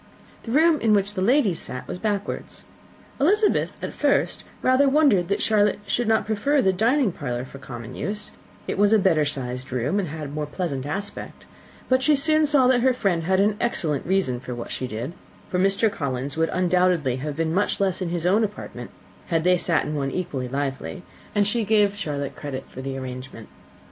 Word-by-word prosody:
The 225 - -7
room 315 +3 +4
in 220 -2 +3
which 205 0 +1
the 190 - -3
ladies 215 - +3
sat 125 - -7
was 180 - -5
backwards. 205 -1 -3 0.6
Elizabeth 410 +9 +2
at - - -4
first - - +1
had - - -23 0.2
rather 260 +2 +4
wondered 270 - +4
that 200 - 0
Charlotte 210 -2 +3
should 235 +3 0
not 220 0 +2
prefer 250 +7 +1
the 190 -7 +3
dining 235 +4 +2
parlour 125 -6 -4
for 135 +1 -11
common 120 -4 -8
use; 210 +1 -4 0.4
it - - -3
was 205 +1 +5
a - - +7
better 180 -6 +3
sized 130 -2 -3
room, 130 - 0
and 190 - -2
had 150 -1 -6
a 150 -1 -2
pleasanter 145 -4 -3
aspect: 200 +6 -6 0.4
but 260 0 +3
she 300 +2 +4
soon 310 +2 +3
saw 280 -3 +4
that 250 -1 +4
her 260 +1 +4
friend 190 -9 0
had 190 +1 +2
an 205 +1 +3
excellent 160 - -1
reason 180 -10 +1
for 125 -1 -6
what 120 - -7
she 130 - -3
did, 120 +8 -5 0.3
for 180 - -1
Mr. 195 +3 +3
Collins 140 -2 -3
would 160 0 +1
undoubtedly 180 -7 +2
have 145 +2 -4
been 160 +1 -1
much 205 +3 0
less 190 -2 0
in 180 - -1
his 170 -1 -2
own 200 +5 +4
apartment 210 -1 -5 0.4
had 165 -3 +1
they 180 +1 +5
sat 170 -3 +1
in 150 - -3
one 140 -2 -1
equally 140 -6 -3
lively; 140 +6 -4 0.3
and 205 -1 +3
she 225 +3 0
gave 205 -1 +3
Charlotte 145 -8 -4
credit 135 -3 -6
for 130 - -9
the 135 0 -4
arrangement. 130 -3 -8
185 Hz, 200 wpm, -24 LUFS, 140-215 Hz, 0.6 s, a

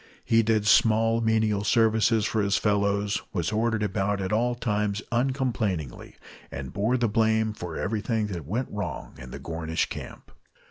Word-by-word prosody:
He 115 0 +4
did 110 -1 +1
small 115 +2 +4
menial 110 -2 +1
services 110 0 +3
for 110 0 0
his 100 0 +2
fellows, 100 -1 +1
was 85 +3 -1
ordered 110 0 0
about 100 0 -1
at 95 +1 -2
all 120 +2 +1
times 105 -3 -1
uncomplainingly, 120 - -2 0.3
and 70 -2 -7
bore 110 +6 +1
the 120 -1 +1
blame 110 0 +1
for 90 -5 -6
everything 110 +1 -1
that 85 -5 -6
went 120 +9 -2
wrong 90 -10 -5
in 65 - -9
the - - -7
Gornish 80 0 -2
Camp. - - -9
105 Hz, 155 wpm, -26 LUFS, 100-115 Hz, 0.3 s, He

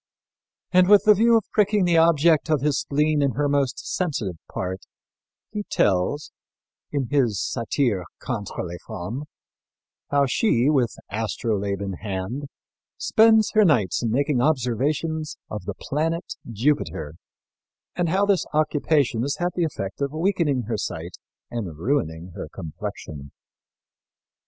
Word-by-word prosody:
And 185 0 +5
with 205 -1 +7
the 210 - +8
view 230 +3 +5
of 220 - 0
pricking 210 -2 +3
the 170 -2 +4
object 165 -1 +4
of 155 -4 +2
his 145 -1 +1
spleen 150 +1 +1
in 140 -3 +1
her 145 +5 0
most 140 -2 +1
sensitive 120 - -2
part, 95 +1 -4 0.7
he 210 -1 -3
tells, 100 +10 +1 0.6
in 140 -4 -2
his 120 -9 +2
Satire 115 -5 -1
contre 110 -6 -4
les 85 0 -7
Femmes, 110 +7 -5 0.8
how 140 0 +3
she, 135 - +2
with 125 -7 +1 0.2
astrolabe 100 -2 -2
in 100 -1 -3
hand, 105 +7 -4 0.5
spends 220 -1 +4
her 215 -1 +6
nights 125 - +2
in 115 - 0
making 140 +2 +1
observations 150 +4 0
of 105 -4 -5
the 100 -1 -4
planet 165 +4 -2 0.2
Jupiter 115 - -1 0.8
and 175 -2 0
how 195 +4 +2
this 200 -3 +1
occupation 150 -5 +2
has 140 +3 -1
had 175 0 0
the 175 -2 +1
effect 100 -8 -5
of 140 +1 -1
weakening 160 -6 +1
her 110 0 -2
sight 85 -3 -5 0.4
and 100 -10 -4
ruining 85 - -1
her - - -7
complexion. 75 -2 -7
140 Hz, 135 wpm, -24 LUFS, 105-160 Hz, 0.8 s, the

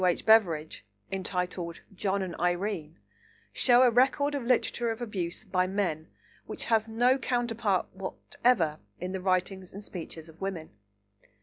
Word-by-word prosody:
H. 180 -1 +2
Beveridge, 175 -9 +3 0.3
entitled 180 -2 -3
John 195 0 -1
and 180 -3 -5
Irene, 175 -2 -1 0.6
show 245 0 +5
a 250 - +5
record 270 +4 +3
of 285 - -1
literature 240 -1 +1
of 225 0 -3
abuse 195 -6 -4
by 185 -2 +1
men 185 -5 -1 0.4
which - - -4
has 225 -1 +2
no 245 +4 +3
counterpart 230 -6 0
whatever 190 -2 0 0.2
in 180 +1 -4
the 190 -1 -4
writings 185 0 -1
and 200 - -7
speeches 165 -4 -7
of 160 +2 -16
women. 185 -5 -4
195 Hz, 140 wpm, -29 LUFS, 180-225 Hz, 0.6 s, show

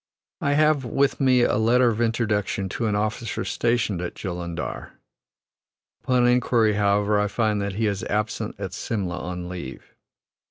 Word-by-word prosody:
I 145 - +1
have 150 -1 +3
with 135 +3 +1
me 130 -2 +4
a - - +2
letter 120 +3 +4
of 115 0 -2
introduction 110 -4 0
to 115 +4 -2
an 105 - 0
officer 110 +2 -2
stationed 115 -6 0
at 90 - -5
Jullundar. 85 -3 -5 1.1
Upon 125 -1 +3
inquiry, 120 -3 +3
however, 105 0 +2
I 105 - +1
find 105 -1 0
that 100 -1 -2
he 110 +3 -1
is 100 -2 -1
absent 105 +1 -2
at 95 -2 -5
Simla 90 -4 -3
on 90 0 -5
leave. 90 -7 -8
105 Hz, 155 wpm, -24 LUFS, 100-120 Hz, 1.1 s, me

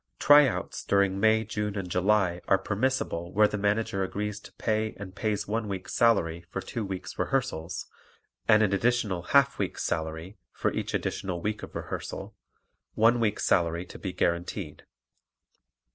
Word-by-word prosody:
"Tryouts" 145 -2 +4
during 100 -1 +2
May, 110 +1 +4
June 105 -1 -3
and 95 -2 -3
July 90 -1 +2
are 95 - +5
permissible 100 -4 -1
where 105 +2 +5
the 105 - -4
Manager 100 -1 0
agrees 105 +2 -3
to - - -14
pay 110 -1 -1
and 95 -2 -8
pays 105 0 -2
one 110 +1 -1
week's 95 -2 -5
salary 85 -8 +2
for - - -4
two 115 - -4
weeks' 95 -3 -6
rehearsals 120 -12 -1 0.6
and 110 0 +6
an 100 -2 +2
additional 105 -4 +1
half 140 +7 +3
week's - - -2
salary 80 +4 -3
for - - -1
each - - -2
additional 90 -2 -2
week 105 +4 -3
of - - -9
rehearsal, - - -6 0.6
one 115 +2 +4
week's 110 -3 0
salary 85 0 +2
to - - -11
be 95 - -4
guaranteed. 85 0 -2
100 Hz, 155 wpm, -28 LUFS, 90-110 Hz, 0.6 s, and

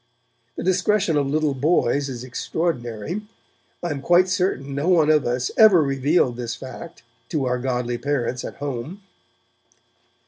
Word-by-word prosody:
The - - -5
discretion 185 -1 +2
of 145 -2 +1
little 150 0 +1
boys 140 -1 +1
is 125 -2 -6
extraordinary. 130 - -3 0.6
I 175 - -1
am 140 -2 -4
quite 175 +5 +4
certain 180 -7 -1
no 145 +6 -1
one 160 -4 +4
of 150 -4 +2
us 125 0 -1
ever 215 -5 +7
revealed 140 -2 +1
this 120 -2 -4
fact 165 +6 -10 0.3
to 150 -5 -1
our 125 0 0
godly 125 -1 -2
parents 125 -2 -2
at - - -7
home. 145 - -6
140 Hz, 145 wpm, -22 LUFS, 125-170 Hz, 0.6 s, ever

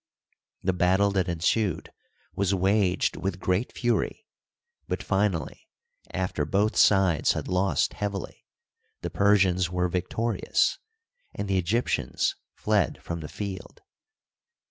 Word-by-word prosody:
The 95 - +1
battle 95 +3 +3
that 95 -2 0
ensued 90 +3 0 0.4
was 100 0 +1
waged 95 -1 +1
with 90 0 -3
creat 95 +6 0
fury; 120 - -1 0.6
but, - - -3
finally, - - -1 0.4
after 90 -5 -2
both 100 +8 +1
sides 95 -6 +4
had - - -4
lost 90 -4 +1
heavily, 100 -1 -5 0.6
the - - -4
Persians 95 -3 +3
were 90 0 0
victorious, 110 - 0 0.6
and 100 - -3
the 95 -1 +2
Egyp 110 +8 +1
tians - - -1 0.2
fled - - +1
from 85 0 -4
the 75 -2 -7
field. 95 +2 -7
95 Hz, 120 wpm, -26 LUFS, 90-100 Hz, 0.6 s, sides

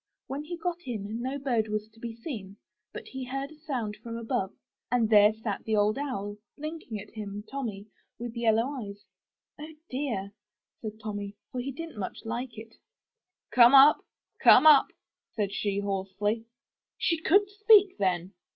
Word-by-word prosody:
When 280 +2 -5
he 345 +2 -5
got 350 -2 -4
in, 220 -1 -4
no 260 +3 -2
bird 245 -6 0
was 215 0 -3
to 225 +1 -22
be 230 -1 -6
seen, 215 -6 -7 0.3
but - - -9
he 265 0 -6
heard 270 +3 -4
a - - -13
sound 245 -9 -3
from 230 +1 -7
above, 230 -4 -2 0.4
and 245 -2 +3
there 210 0 +7
sat 215 -2 -4
Old 215 +2 +2
Owl, 205 -8 -4 0.2
blinking 305 -7 -6
at 200 - -11
him 205 -1 -6
— - - -21
Tommy 225 -8 -4 0.2
— - - -50
with 240 0 -6
yellow 225 -1 +3 0.2
eyes. 200 -1 -9 0.5
'*0h, 305 +1 -9
dear!" 250 -8 -2 0.5
said 215 -1 -6
Tommy, 205 -2 -5 0.2
for 250 - -3
he 275 +3 -4
didn*t 325 -1 -8
much 190 - -6
like 235 +1 -4
it. 225 +1 -11 0.7
'*Come 240 +2 +7
up, 275 +3 +8 0.4
come - - +7
up!*' 300 -3 +7 0.4
said 200 -3 -1
she 200 -1 -1
hoarsely. 200 +2 -2 0.5
She 335 -2 0
could 400 +5 +4
speak 410 - +5
then! 185 -1 0
230 Hz, 170 wpm, -28 LUFS, 205-275 Hz, 0.7 s, up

